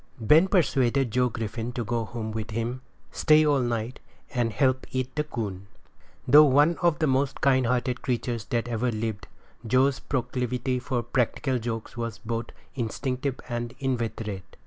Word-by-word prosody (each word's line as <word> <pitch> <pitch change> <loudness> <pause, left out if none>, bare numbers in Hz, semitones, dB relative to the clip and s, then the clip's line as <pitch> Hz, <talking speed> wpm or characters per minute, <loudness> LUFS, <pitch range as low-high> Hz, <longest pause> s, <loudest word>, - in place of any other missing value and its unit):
Ben 150 - +5
persuaded 135 - +2
Joe 125 +2 +2
Griffin 115 +1 -4
to 120 - -2
go 115 +1 -1
home 110 +1 -5
with 110 0 -4
him, 115 +3 -3 0.3
stay 155 -1 +4
all 145 -2 +3
night, 120 0 -2 0.3
and 120 -3 +1
help 130 +2 +1
eat 130 0 -3
the 150 - +1
coon. 100 -9 -5 0.6
Though 150 +4 +9
one 145 +4 +4
of 170 -3 +3
the 160 - +1
most 135 0 +1
kind 130 -3 +3
hearted 125 0 0
creatures 120 -3 -2
that 120 0 -1
ever 120 +1 0
lived, 110 -2 -4 0.4
Joe's 130 +4 +2
proclivity 125 0 -2
for 125 -1 -2
practical 125 +2 0
jokes 115 0 -5
was 115 -2 -3
both 115 0 -4 0.3
instinctive 130 +2 -3
and 120 -1 -4
inveterate. 110 -8 -3
125 Hz, 155 wpm, -26 LUFS, 115-130 Hz, 0.6 s, Though